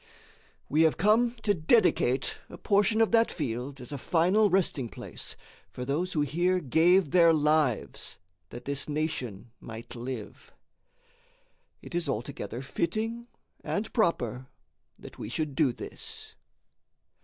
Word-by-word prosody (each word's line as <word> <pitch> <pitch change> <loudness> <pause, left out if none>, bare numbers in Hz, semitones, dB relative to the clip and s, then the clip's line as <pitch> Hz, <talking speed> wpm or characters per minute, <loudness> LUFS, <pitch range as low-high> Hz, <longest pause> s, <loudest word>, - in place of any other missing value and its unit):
We 155 +3 +2
have 160 -1 +4
come 230 +4 +3
to 205 - +3
dedicate 155 - +2
a - - -9
portion 210 +2 +2
of 225 - +3
that 230 0 +4
field 135 -1 -4
as 125 +3 -9
a 140 - -4
final 185 - +3
resting 165 -10 +1
place - - -7 0.3
for 125 - -6
those 160 +7 -1
who 150 - +1
here 175 +6 +1
gave 165 +3 +3
their 170 -2 +6
lives 150 -5 +1 0.3
that 120 - -9
that 140 +1 -1
nation 130 -8 -3
might 115 +2 -9
live. 120 -2 -7 1.3
It - - -10
is 170 -3 -1
altogether 115 0 -4
fitting 220 - -2 0.4
and 210 +2 -3
proper 130 - 0 0.5
that - - -12
we 105 - -5
should 150 +3 -2
do 140 -2 +3
this. - - -7
155 Hz, 130 wpm, -28 LUFS, 130-185 Hz, 1.3 s, their